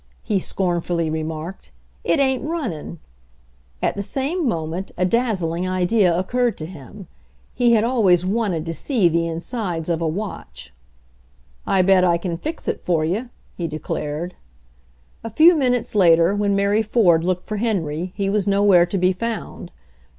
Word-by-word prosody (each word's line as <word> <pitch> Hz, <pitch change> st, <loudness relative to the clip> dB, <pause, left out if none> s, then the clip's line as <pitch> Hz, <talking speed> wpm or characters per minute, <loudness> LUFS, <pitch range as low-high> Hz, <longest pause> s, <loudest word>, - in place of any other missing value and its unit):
he 210 Hz, -4 st, 0 dB
scornfully 175 Hz, -3 st, -1 dB
remarked. 160 Hz, +3 st, -5 dB, 0.3 s
"It -, -, +2 dB
ain't 265 Hz, -2 st, +2 dB
runnin' 265 Hz, -, -4 dB, 0.4 s
!" -, -, -25 dB
At -, -, +1 dB
the 200 Hz, -, -3 dB
same 280 Hz, -, -2 dB
moment 170 Hz, 0 st, -3 dB
a 180 Hz, -, +2 dB
daz 225 Hz, -2 st, 0 dB
zling 170 Hz, +3 st, -2 dB
idea 185 Hz, +1 st, +2 dB
occurred 240 Hz, +6 st, 0 dB
to 155 Hz, -, -5 dB
him. 175 Hz, +4 st, -11 dB, 0.5 s
He 240 Hz, -1 st, +3 dB
had 220 Hz, -2 st, +4 dB
always 200 Hz, -8 st, +3 dB
wanted 190 Hz, -5 st, -1 dB
to 165 Hz, -, -3 dB
see 220 Hz, -, +1 dB
the 170 Hz, 0 st, +1 dB
insides 170 Hz, 0 st, -4 dB
of 170 Hz, -1 st, 0 dB
a 165 Hz, -, 0 dB
watch. 195 Hz, +6 st, -6 dB, 0.9 s
"I 190 Hz, -1 st, +3 dB
bet 190 Hz, 0 st, +4 dB
I 175 Hz, -1 st, +3 dB
c'n 170 Hz, -1 st, -4 dB
fix 315 Hz, -, -6 dB
it -, -, -2 dB
for 165 Hz, -3 st, 0 dB
you," 215 Hz, +10 st, -2 dB, 0.3 s
he 170 Hz, -, -3 dB
declared. 155 Hz, +2 st, -4 dB, 0.9 s
A 225 Hz, -, -4 dB
few 320 Hz, +10 st, +6 dB
minutes 250 Hz, -5 st, 0 dB
later, 170 Hz, -2 st, +5 dB
when 205 Hz, -1 st, +1 dB
Mary 200 Hz, +2 st, +2 dB
Ford 195 Hz, -7 st, +3 dB
looked 180 Hz, 0 st, -1 dB
for 215 Hz, -, -5 dB
Henry, 180 Hz, -6 st, -2 dB
he 200 Hz, -1 st, -1 dB
was 205 Hz, 0 st, 0 dB
nowhere 195 Hz, -3 st, +4 dB
to 195 Hz, -, -2 dB
be 185 Hz, 0 st, +2 dB
found. 225 Hz, -3 st, -5 dB
185 Hz, 165 wpm, -21 LUFS, 170-220 Hz, 0.9 s, few